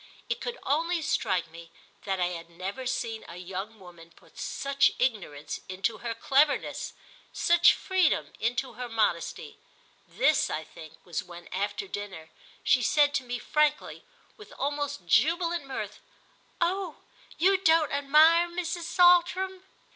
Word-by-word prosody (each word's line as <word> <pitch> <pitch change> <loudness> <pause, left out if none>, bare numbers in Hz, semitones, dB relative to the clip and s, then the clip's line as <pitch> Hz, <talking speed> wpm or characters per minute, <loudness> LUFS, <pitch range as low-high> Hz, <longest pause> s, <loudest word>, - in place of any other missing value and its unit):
It 475 - -2
could 485 0 -4
only 335 +4 +1
strike 185 - 0
me 165 0 -12 0.4
that 195 -1 -1
I 180 -1 +1
had 170 -1 -7
never 190 +9 -6
seen 230 -3 -3
a 170 - -10
young 190 +4 -6
woman 170 -3 -14
put - - -23
such 275 0 +1
ignorance 195 - -2
into 195 +4 -2
her 235 -1 -4
cleverness, 280 +5 +1 0.4
such 345 0 +5
freedom 375 -4 +1
into 245 +3 -1
her 245 +1 -6
modesty; 210 -7 -1 0.5
this, 310 - +2
I 155 - -3
think, 160 -1 -13
was 175 - -3
when, 175 -1 -12
after 200 +1 -3
dinner, 190 -6 -7 0.3
she 255 - +4
said 290 +5 +3
to 275 - 0
me 245 0 -4
frankly, 300 +3 0 0.3
with 420 - -13
almost 285 -6 -3
jubilant 335 - +2
mirth: 270 - -5 0.6
"Oh 360 -1 -1 0.3
you 380 +4 +4
don't 325 -4 +3
admire 310 +5 +5
Mrs. 345 -1 -4
Saltram?" 365 +1 +4
260 Hz, 140 wpm, -28 LUFS, -, 0.6 s, such